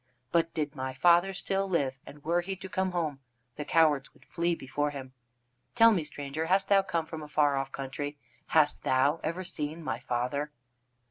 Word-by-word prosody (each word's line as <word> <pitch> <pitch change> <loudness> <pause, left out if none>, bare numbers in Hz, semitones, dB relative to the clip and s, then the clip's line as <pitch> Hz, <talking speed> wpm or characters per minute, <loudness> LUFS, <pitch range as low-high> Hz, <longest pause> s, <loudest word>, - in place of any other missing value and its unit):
But 165 -1 +2
did 150 -2 -1
my 130 -1 -4
father 175 +5 +5
still 195 +1 -2
live, 135 -7 0
and 145 0 -12
were 170 +2 +2
he 190 +2 -4
to 190 0 -8
come 190 -1 0
home, 160 -6 -2 0.4
the 150 - -4
cowards 155 -2 +3
would - - -22
flee 170 0 0
before 145 +1 -2
him. 135 -3 -8 0.6
Tell 230 -1 +7
me, 185 -7 +1
stranger, 150 +1 -4
hast 190 +2 +2
thou 200 -1 +6
come 170 -4 -2
from 160 -1 -7
a 150 - -8
far 145 -1 +2
off 135 0 -2
country? 140 +2 -5 0.3
Hast 155 -2 +3
thou 140 +5 +2
ever 170 +4 -2
seen 155 -1 -4
my - - -2
father?" 125 +5 -2
155 Hz, 190 wpm, -29 LUFS, 140-175 Hz, 0.6 s, Tell